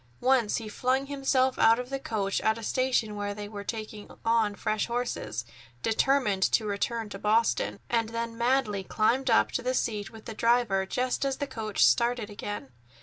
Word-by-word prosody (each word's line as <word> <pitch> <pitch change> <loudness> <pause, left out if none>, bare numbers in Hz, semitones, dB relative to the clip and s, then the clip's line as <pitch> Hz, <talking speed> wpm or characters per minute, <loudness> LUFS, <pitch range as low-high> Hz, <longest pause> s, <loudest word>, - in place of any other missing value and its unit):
Once 255 -4 +2
he 225 - -5
flung 255 +5 0
himself 270 -2 +1
out 225 +1 +6
of 250 +1 -6
the 270 - -2
coach 205 -6 -1
at 220 0 +2
a 230 - -8
station 250 -3 0
where 205 0 -3
they 205 0 -6
were 205 -1 -7
taking 215 -1 -6 0.2
on 225 -2 +2
fresh 215 +1 -1
horses, 235 - -3 0.4
determined 225 -3 +2
to 215 +3 +3
return 210 +2 -2
to 195 -1 -8
Boston, 220 +3 +1
and 230 -2 0
then 230 0 -4
madly 235 -4 +1
climbed 240 +7 +1
up 225 - +4
to - - -1
the 255 +1 -1
seat 210 -5 -1
with 220 -1 -13
the 225 - -6
driver 230 -4 +2
just 255 +6 -1
as 275 -1 0
the 285 - -2
coach 220 - +1
started 230 - +2
again. 205 -8 -6
225 Hz, 185 wpm, -28 LUFS, 210-250 Hz, 0.4 s, out